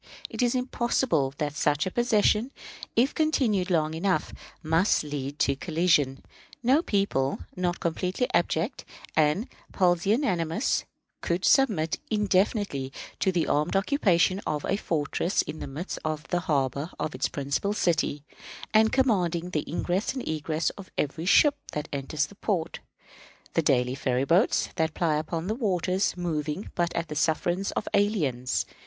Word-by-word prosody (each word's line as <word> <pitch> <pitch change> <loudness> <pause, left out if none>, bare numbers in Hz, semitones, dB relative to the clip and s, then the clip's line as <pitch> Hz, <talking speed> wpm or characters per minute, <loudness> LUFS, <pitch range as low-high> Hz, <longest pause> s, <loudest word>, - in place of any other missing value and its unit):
It - - -3
is 245 0 +2
impossible 240 - +1
but 140 - -20
that 150 -1 -2
such 145 0 +1
a 185 - -2
possession, 230 0 +2 0.5
if 250 +5 +3
continued 240 - +1
long 160 -3 +1
enough, 165 -1 0 0.3
must 165 +5 +2
lead 145 -1 -5
to 140 - +2
collision. 155 -4 +1 0.4
No 265 +6 +4
people, 195 - 0 0.2
not 180 -1 -1
completely 180 +8 -1
abject 175 - 0 0.3
and 155 - +2 0.3
pusillanimous, 180 - +1 0.4
could 175 +2 -1
submit, 205 - +3
indefinitely, 200 - +1 0.3
to 190 - +2
the 175 -3 +1
armed 150 +5 0
occupation 195 - +2
of 150 -1 -2
a 195 - +1
fortress 170 0 0
in 155 - -7
the - - -5
midst 150 +7 -5
of 155 -1 -3
the 175 - +1
harbor 140 -2 -1
of 155 - -2
its 130 - -1
principal 140 +8 -1
city, 160 -7 0 0.5
and 220 0 +5
commanding 180 -9 +1
the 155 -4 -1
ingress 180 +8 -1
and 260 - -5
egress 155 +1 -1
of 195 -2 -12
every 160 +4 -2
ship 290 +8 +5 0.2
that 150 +1 -3
enters 140 +2 -1
the 200 - -14
port, 195 -5 -2 0.7
the - - +3
daily 125 -4 +2
ferry 130 -1 0
boats 175 - +3
that 160 -2 0
ply 160 -3 +1
upon 160 +2 -3
the 210 - -1
waters 190 -5 0
moving 160 +1 -3
but 170 -1 0
at 170 0 -1
the 150 - -6
sufferance 175 +5 0
of - - -3
aliens. 145 - +1
170 Hz, 150 wpm, -27 LUFS, 150-200 Hz, 0.7 s, and